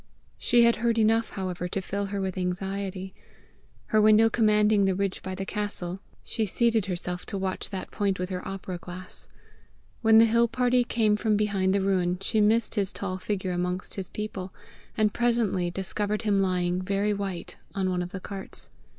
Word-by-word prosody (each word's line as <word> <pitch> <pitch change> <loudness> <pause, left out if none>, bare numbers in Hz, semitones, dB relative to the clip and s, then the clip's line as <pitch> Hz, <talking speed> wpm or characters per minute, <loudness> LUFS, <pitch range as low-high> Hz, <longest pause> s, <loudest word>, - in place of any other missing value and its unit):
She 240 -1 +4
had 235 0 +4
heard 230 0 +1
enough, 225 +1 +3
however, 180 -2 -4
to 185 - -2
fill 200 +1 -3
her 200 0 -3
with 190 -1 -2
anxiety. 190 +1 -3 0.8
Her 215 - +6
window 215 +1 +6
commanding 210 -2 +4
the 190 -1 +2
ridge 195 0 -2
by 185 0 -5
the 195 +1 -4
castle, 195 -3 -2 0.2
she 225 - -1
seated 225 0 +2
herself 180 -1 -3
to 200 - -3
watch 190 -1 -3
that 190 -2 -6
point 200 -2 0
with 180 0 -3
her 180 -1 -3
opera 190 -2 -5
glass. 180 +1 -10 0.7
When 220 -1 +6
the 225 - +8
hill 235 +1 +3
party 245 +1 +2
came 220 -3 +2
from 215 -1 +1
behind 200 -2 +1
the 200 - +2
ruin, 185 -2 +1
she 215 +3 +1
missed 220 +2 +3
his 200 -2 0
tall 185 -1 -4
figure 190 -1 -2
amongst 180 +1 -2
his 190 -2 -4
people, 195 -3 -5 0.5
and 215 -2 +2
presently 230 -7 +1
discovered 205 +4 -2
him 205 -2 +2
lying 180 -1 +1
very 200 +2 0
white 195 -3 -5 0.2
on 190 -1 0
one 180 -1 0
of 175 - -4
the 195 - -5
carts. 195 0 -6
195 Hz, 185 wpm, -27 LUFS, 185-215 Hz, 0.8 s, the